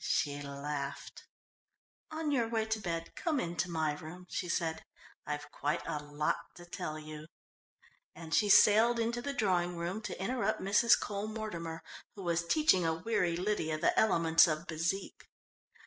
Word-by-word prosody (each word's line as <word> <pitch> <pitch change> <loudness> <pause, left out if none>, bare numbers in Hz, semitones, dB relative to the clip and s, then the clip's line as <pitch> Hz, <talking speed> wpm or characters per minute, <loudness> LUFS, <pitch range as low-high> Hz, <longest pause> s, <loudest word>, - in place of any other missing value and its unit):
She 145 -1 0
laughed. 140 0 -5 0.8
"On 315 -1 -2
your 240 -5 +1
way 225 -1 0
to 220 0 -1
bed, 165 -4 -4
come 315 -5 0
in 175 -4 -3
to 175 - 0
my 160 -3 0
room," 160 +4 -9
she 180 - -3
said. 160 -1 -1 0.4
"I've 150 0 -4
quite 150 +4 -2
a 150 - -3
lot 145 +1 -1 0.2
to 175 - -12
tell 155 -3 -5
you," 155 0 -9 0.9
and 160 -1 -8
she 210 - +3
sailed 220 +4 +6
into 235 +1 -1
the 280 - -3
drawing 180 -9 0
room 175 +5 -3
to - - -6
interrupt 215 +1 -1
Mrs. 205 +4 +4
Cole 205 0 -3
Mortimer, 170 -7 -5 0.3
who 200 - -8
was 170 -1 0
teaching 300 - +4
a 160 -1 +1
weary 175 -2 0
Lydia 180 -5 -1
the 160 - +2
elements 165 -6 +5
of 155 +1 -2
bezique. 170 +4 -3
175 Hz, 165 wpm, -32 LUFS, 160-215 Hz, 0.9 s, sailed